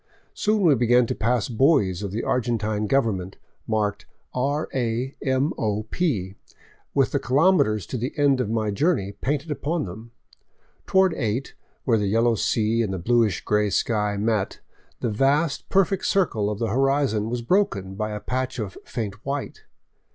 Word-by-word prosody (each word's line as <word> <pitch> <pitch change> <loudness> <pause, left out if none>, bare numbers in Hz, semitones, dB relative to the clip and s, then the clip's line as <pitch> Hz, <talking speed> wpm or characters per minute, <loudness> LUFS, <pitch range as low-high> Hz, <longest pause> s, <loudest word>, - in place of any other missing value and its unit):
Soon 210 -1 +1
we 165 -5 +6
began 120 0 +4
to - - -2
pass 115 -1 0
buoys 115 - +2
of 100 - -3
the 105 +5 -3
Argen 120 -1 0
tine 105 0 -1
government, 100 -8 0 0.3
marked 105 -2 -1 0.2
" - - -47 0.2
R. 150 +2 -2
A. 125 +1 -1
m. 135 +3 +1
o. 105 -1 -1
p.," 105 - -1 0.6
with - - +3
the - - +1
kilometers 130 - +3
to 125 - -4
the 125 +5 -2
end 140 -3 +3
of 105 - -2
my 110 -2 0
journey 100 - +1
painted 145 +8 -3
upon 155 +1 -2
them. 110 +6 -9 0.8
Toward 190 -2 +4
eight, 115 +2 -2 0.3
where 115 -4 +2
the 105 - 0
yellow 115 +3 +3
sea 110 +1 +1
and 105 -4 -1
the 95 - -2
bluish 110 0 +2
gray 105 0 +2
sky 105 0 0
met, 105 -1 -1 0.4
the 120 - 0
vast, 140 +7 +1
perfect 195 0 +2
circle 115 - +1
of 105 - -3
the 115 +1 -1
horizon 135 -3 +1
was 120 0 -3
broken 115 - +1
by 105 +2 -3
a 105 0 -4
patch 130 +5 -3
of 105 -5 -5
faint 105 -2 -5
white. 140 0 -4
115 Hz, 170 wpm, -24 LUFS, 105-135 Hz, 0.8 s, we